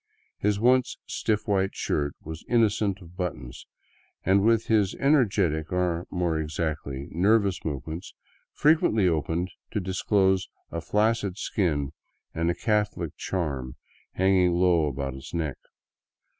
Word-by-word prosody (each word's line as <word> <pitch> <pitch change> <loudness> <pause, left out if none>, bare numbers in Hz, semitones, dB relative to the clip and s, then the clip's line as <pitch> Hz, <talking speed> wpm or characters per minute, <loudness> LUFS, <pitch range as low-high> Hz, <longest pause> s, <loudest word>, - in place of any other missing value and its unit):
His 105 -1 +1
once 125 +2 +3
stiff 105 -1 -1
white 95 -2 +1
shirt 70 -1 -1
was 80 +1 -7
innocent 105 -4 +2
of 85 +1 -15
buttons, 70 -10 -5 0.6
and 95 +2 +4
with 115 0 +3
his 105 -4 +2
ener 140 -2 +4
getic, 80 -6 0
or, 90 -1 0
more 85 -3 0
exactly, 75 -3 -3
nervous 100 +2 +2
movements, 80 +4 -5 0.4
frequently 145 - +3
opened 85 +2 0 0.2
to - - -2
disclose 95 0 +1 0.2
a 85 - -3
flacid 105 0 +1
skin 75 -10 -1 0.4
and 85 +1 0
a 85 - 0
Catholic 105 -7 -1
charm 70 -9 -3 0.4
hanging 95 -2 +3
low 85 -3 +3
about 70 -1 -3
his 65 +6 -9
neck. 80 -5 -2
90 Hz, 130 wpm, -26 LUFS, 80-105 Hz, 0.6 s, and